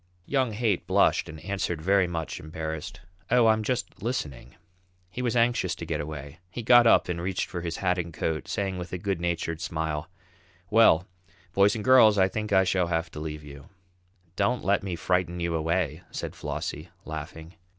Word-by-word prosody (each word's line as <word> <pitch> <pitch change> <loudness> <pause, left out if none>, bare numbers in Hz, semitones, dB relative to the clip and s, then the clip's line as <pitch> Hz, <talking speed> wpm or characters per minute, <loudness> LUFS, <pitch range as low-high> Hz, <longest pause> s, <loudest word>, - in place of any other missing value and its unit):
Young 130 -5 0
Haight 105 -4 0
blushed - - +3
and 80 0 -9
answered 95 -4 -2
very 95 +3 +3
much 85 -2 -4
embarrassed: 80 +1 -6 0.3
"Oh, 125 0 +5
I'm 110 0 +4
just 125 +3 -3
listening." 75 - -4 0.6
He 125 - -5
was 125 -1 0
anxious 120 0 +2
to - - -7
get - - -2
away. 75 +1 -7
He 120 +6 -6
got 120 0 +7
up - - +5
and 85 -1 -3
reached 95 +1 -1
for 90 -1 -5
his 85 -1 -4
hat 90 -1 +1
and 85 -1 -4
coat, 80 0 -3
saying 95 -4 -2
with 90 - -7
a - - -1
good 95 -1 -2
natured 85 -2 -2
smile: 80 -2 -3 0.6
"Well, 105 -6 +6 0.5
boys 100 +2 +4
and 110 - -4
girls, 110 -5 +7
I 95 -1 +5
think 105 +1 -4
I 95 -1 +5
shall 90 -1 +1
have 80 -1 -1
to - - -8
leave 75 -1 -5
you." 70 -1 -12 0.7
"Don't 125 +6 0
let 100 +1 +3
me 95 -3 -3
frighten 90 0 0
you 85 -1 -1
away," 80 0 -1
said - - -5
Flossie, 75 +4 -5 0.2
laughing. 80 +2 -7
90 Hz, 185 wpm, -27 LUFS, 80-105 Hz, 0.7 s, got